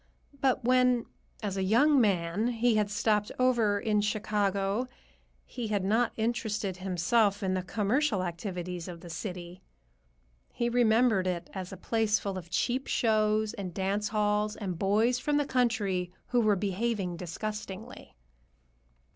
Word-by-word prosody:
But 265 -2 +1
when, 250 -1 +3 0.4
as 200 -2 -2
a 190 - 0
young 265 +8 +4
man, 195 0 +1
he 240 0 +2
had 210 -1 +1
stopped 210 -1 +1
over 235 -5 +2
in 210 0 +1
Chicago, 205 +1 0 0.6
he 240 -3 -5
had 205 -3 0
not 225 +4 +2
interested 220 -4 -1
himself 195 +3 +1
in 190 -1 0
the 185 - 0
commercial 210 +3 0
activities 180 0 -5
of 170 -2 -8
the 175 -2 -9
city. 180 0 -6 0.9
He 235 0 -1
remembered 230 -4 +3
it 175 -2 -3
as 185 -2 -6
a 190 - -7
place 220 +2 +1
full 200 -2 -4
of 175 -3 -7
cheap 250 +9 -1
shows 215 -1 +2
and 185 -4 -6
dance 200 +2 0
halls 210 0 0
and 185 -6 -5
boys 220 +5 +2
from 295 +2 0
the 290 - +1
country 210 -9 0 0.2
who 245 -1 +3
were 215 -2 +3
behaving 200 -1 -1
disgustingly. 195 +4 -6
Dr. - - -30
210 Hz, 145 wpm, -29 LUFS, 190-230 Hz, 0.9 s, young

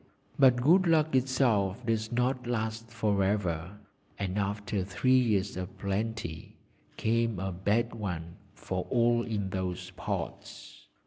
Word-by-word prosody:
But 130 -3 +7
good 175 +6 +5
luck 160 -2 +3
itself 125 -5 +2
does 110 -1 0
not 125 +1 0
last 110 -1 -2
for 105 -3 +1
ever, 95 -2 -1 0.4
and 100 0 -2
after 100 0 -1
three 130 +7 +3
years 105 -5 +1
of 90 +1 -6
plenty 100 -4 -3 0.4
came 115 -1 +1
a 95 +1 -2
bad 105 +6 0
one 85 -6 -5 0.2
for 90 -1 -4
all 120 -1 +3
in 105 -5 -3
those 95 -2 -3
parts. - - -6
110 Hz, 130 wpm, -30 LUFS, 95-120 Hz, 0.4 s, But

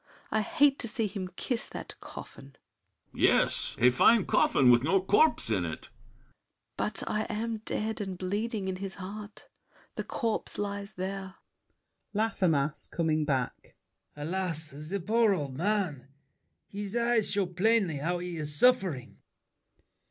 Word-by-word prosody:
I 215 - +2
hate 290 +2 +3
to 235 - -1
see 225 0 -1
him 195 -2 -4
kiss 245 +3 -2
that - - -7
coffin. 135 0 -11 0.6
BRICHANTEAU. - - -7
Yes—a 125 +2 +3
fine 210 - +5
coffin 125 -2 +4
with 120 -1 +6
no 185 +8 +3
corpse 205 - +3
in 95 -5 +1
it! 80 -2 -6
SAVERNY. - - -33
But - - -2
I 210 - -1
am 225 +1 -2
dead 220 0 -3
and 190 -3 -4
bleeding 205 +2 -2
in 185 -1 -2
his 195 0 -6
heart. 205 +2 -9 0.5
The - - -1
corpse 230 -3 -2
lies 200 0 -4
there. 190 0 -5 0.8
LAFFEMAS 175 -10 +1
(coming 155 -2 0
back). 130 -4 -2 0.4
Alas, 160 0 -3
the 155 +8 -4
poor 215 +2 +3
old 140 -6 -4
man! 175 -6 -1 0.6
His 205 +1 -5
eyes 235 -2 +2
show 200 -1 +1
plainly 185 -2 +2
how 170 +5 -1
he's 165 -4 -3
suffering! 185 - +2
190 Hz, 135 wpm, -29 LUFS, 155-215 Hz, 0.8 s, with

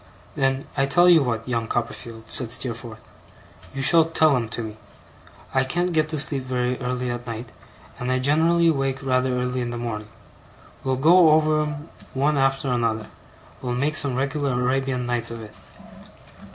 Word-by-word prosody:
'Then 135 0 0
I 135 -1 +1
tell 175 +5 +4
you 170 -3 +7
what, 115 -3 -2
young 115 -2 -1
Copperfield,' 115 -1 -5
said 125 - -1
Steerforth, 120 -2 -3 0.7
'you 135 0 -3
shall 165 +3 +6
tell 160 -2 +3
'em 115 -3 -2
to 115 0 -4
me. 110 -1 -7 0.8
I 130 - +3
can't 175 +6 -1
get 155 -1 +1
to 155 - -3
sleep 140 -1 -1
very 125 -1 -1
early 125 0 -2
at 120 0 -6
night, 115 +1 -6 0.5
and 125 +1 -2
I 130 - +2
generally 165 +5 +3
wake 135 -2 -2
rather 130 -1 +1
early 125 0 -1
in 120 - -3
the 120 - -4
morning. 110 -3 -4 0.8
We'll 130 -1 0
go 165 +5 +6
over 155 0 +3
'em 150 +1 -5 0.3
one 145 +3 +2
after 135 0 +1
another. 115 -3 -1 0.5
We'll 125 -1 -2
make 145 +5 0
some 140 -4 +2
regular 140 +1 -1
Arabian 130 0 0
Nights 120 -1 0
of 115 -1 -7
it. 105 - -12
130 Hz, 175 wpm, -23 LUFS, 120-145 Hz, 0.8 s, you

